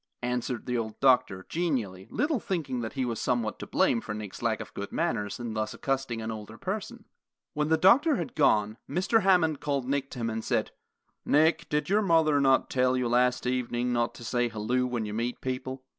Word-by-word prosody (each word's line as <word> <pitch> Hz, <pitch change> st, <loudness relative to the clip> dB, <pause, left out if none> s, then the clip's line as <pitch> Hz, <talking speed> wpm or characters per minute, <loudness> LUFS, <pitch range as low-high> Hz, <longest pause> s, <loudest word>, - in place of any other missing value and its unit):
answered 125 Hz, -1 st, -2 dB
the 125 Hz, -, -2 dB
old 110 Hz, -2 st, -3 dB
doctor, 125 Hz, -8 st, +3 dB
genially, 120 Hz, -, -2 dB
little 295 Hz, -3 st, 0 dB
thinking 155 Hz, -11 st, -3 dB
that 110 Hz, -, -5 dB
he 130 Hz, -2 st, -1 dB
was 115 Hz, -3 st, -3 dB
somewhat 120 Hz, -4 st, -1 dB
to -, -, -7 dB
blame 115 Hz, -, +2 dB
for 105 Hz, -, -5 dB
Nick's 105 Hz, -3 st, -7 dB
lack 115 Hz, -2 st, 0 dB
of -, -, -8 dB
good 100 Hz, -, -6 dB
manners 110 Hz, -, -1 dB
in 120 Hz, -2 st, -4 dB
thus 110 Hz, 0 st, -2 dB
accosting 135 Hz, -4 st, -2 dB
an 110 Hz, -, -3 dB
older 105 Hz, -2 st, -8 dB
person. -, -, -5 dB, 0.5 s
When 150 Hz, 0 st, 0 dB
the 160 Hz, +1 st, +3 dB
doctor 255 Hz, -, +5 dB
had 250 Hz, -, -4 dB
gone, 105 Hz, -, +2 dB
Mr. 190 Hz, -, +2 dB
Hammond 175 Hz, -7 st, +3 dB
called 140 Hz, -3 st, -2 dB
Nick 140 Hz, 0 st, -1 dB
to 125 Hz, -, -8 dB
him 115 Hz, -, 0 dB
and 110 Hz, 0 st, -4 dB
said, -, -, 0 dB, 0.5 s
"Nick, 155 Hz, +3 st, +3 dB
did 150 Hz, 0 st, +1 dB
not -, -, -12 dB
your 205 Hz, +2 st, +3 dB
mother 155 Hz, -7 st, +4 dB
tell 130 Hz, 0 st, +2 dB
you 125 Hz, -1 st, 0 dB
last 125 Hz, +1 st, +2 dB
evening 125 Hz, -1 st, -1 dB
not 120 Hz, -1 st, 0 dB
to -, -, -10 dB
say, 120 Hz, +1 st, 0 dB
'Halloo,' 120 Hz, +4 st, 0 dB
when 120 Hz, -3 st, -2 dB
you 105 Hz, -, -5 dB
meet 120 Hz, +3 st, -2 dB
people?" 130 Hz, 0 st, -4 dB
125 Hz, 205 wpm, -28 LUFS, 115-150 Hz, 0.5 s, doctor